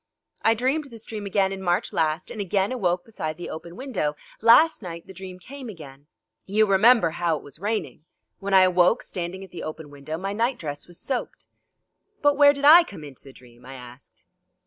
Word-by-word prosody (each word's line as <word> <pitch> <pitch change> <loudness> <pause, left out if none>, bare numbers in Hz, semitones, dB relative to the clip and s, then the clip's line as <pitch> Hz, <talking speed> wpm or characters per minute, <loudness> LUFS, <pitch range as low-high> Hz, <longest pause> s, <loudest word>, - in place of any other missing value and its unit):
I 225 - +3
dreamed 265 +6 0
this 230 -5 -9
dream 210 -2 -6
again 195 -1 +1
in 195 0 -6
March 175 -1 -1
last, 160 +2 -1
and 215 - -5
again 195 +1 0
awoke 180 -8 -1
beside 155 -8 -5
the 175 - -7
open 170 +2 -9
window. 220 - -3 0.3
Last 240 +8 +6
night 170 -3 -8
the 190 - -12
dream 185 0 -9
came 260 +5 -10
again. 145 -7 -12 0.4
You 215 +3 +3
remember 200 -2 +5
how 170 -1 -1
it - - -12
was 145 +1 -13
raining; 210 -5 -3 0.4
when 195 0 0
I 190 - +8
awoke, 180 +3 +3
standing 180 +1 -6
at 190 - -13
the 180 - -8
open 155 -1 -7
window, 145 +2 -6
my 195 +3 -4
night 235 +5 0
dress 145 -2 -6
was 175 -1 -10
soaked." 260 -3 -4 0.8
"But 290 0 +4
where 285 0 +7
did 285 0 -3
I 330 +4 +9
come 195 - -11
into 140 -3 -12
the 135 - -13
dream?" 120 -2 -19
I 135 +1 -10
asked. 125 +1 -14
190 Hz, 205 wpm, -24 LUFS, 160-225 Hz, 0.8 s, I